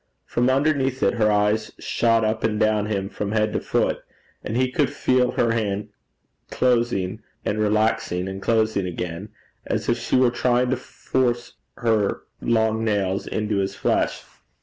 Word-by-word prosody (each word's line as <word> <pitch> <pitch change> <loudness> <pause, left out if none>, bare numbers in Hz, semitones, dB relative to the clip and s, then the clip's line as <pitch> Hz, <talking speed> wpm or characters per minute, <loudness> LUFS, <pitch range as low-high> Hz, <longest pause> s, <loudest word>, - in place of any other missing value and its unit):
From 120 +1 +1
underneath 135 -1 +1
it - - +3
her 110 -3 +2
eyes 105 +1 +1
shot 115 -1 +1
up 110 +1 -1
and 105 -1 0
down 110 -1 +2
him 100 -2 -1
from 105 +1 -4
head 110 -1 +1
to - - 0
foot, - - 0 0.4
and 110 - -3
he 130 0 +1
could 140 +2 +1
feel 125 -1 +1
her 115 - +2
hand 105 -3 -1 0.6
closing 115 -5 +1 0.2
and 105 - -1
relaxing 105 -4 +1
and 95 0 -6
closing 110 -4 +1
again, 90 +3 -5 0.4
as - - -2
if - - +1
she - - -1
were 125 -1 +4
trying 125 +1 +1
to - - +3
force 120 -1 -2 0.2
her 110 -4 +1 0.2
long 110 -1 +1
nails 100 -3 0
into 105 -1 -1
his 100 0 -1
flesh. - - 0
110 Hz, 160 wpm, -23 LUFS, 105-120 Hz, 0.6 s, were